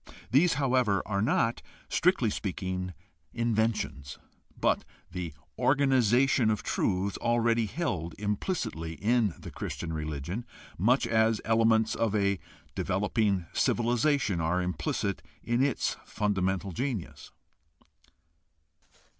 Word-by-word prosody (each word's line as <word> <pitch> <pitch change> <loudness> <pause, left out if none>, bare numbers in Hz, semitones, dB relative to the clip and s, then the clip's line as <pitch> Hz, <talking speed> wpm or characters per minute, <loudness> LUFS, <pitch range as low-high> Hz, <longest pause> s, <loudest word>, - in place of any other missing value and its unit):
These, 165 +7 +5
however, 125 -7 +2
are 100 -1 -1
not, 115 +1 +1 0.3
strictly 170 - +2
speaking, 90 -2 -3 0.4
inventions, 110 - -1 0.4
but - - +2 0.3
the 90 -2 -4 0.3
organization 130 -3 +3
of 105 -2 0
truths 95 +1 0
already 120 -1 +2
held 90 - -3
implicitly 105 - -2
in 110 -2 +1
the - - -9
Christian 80 -1 -5
religion, 80 - -4 0.3
much 120 +9 +3
as 110 0 +2
elements 110 0 +3
of 110 -2 0
a 100 -2 +1 0.3
developing 100 -1 0
civilization 120 - +1
are 85 +3 +1
implicit 90 -3 -2 0.2
in 120 +2 +1
its 140 -2 0
fundamental 95 -2 -1
genius. 120 -2 -4
110 Hz, 100 wpm, -29 LUFS, 90-120 Hz, 0.4 s, These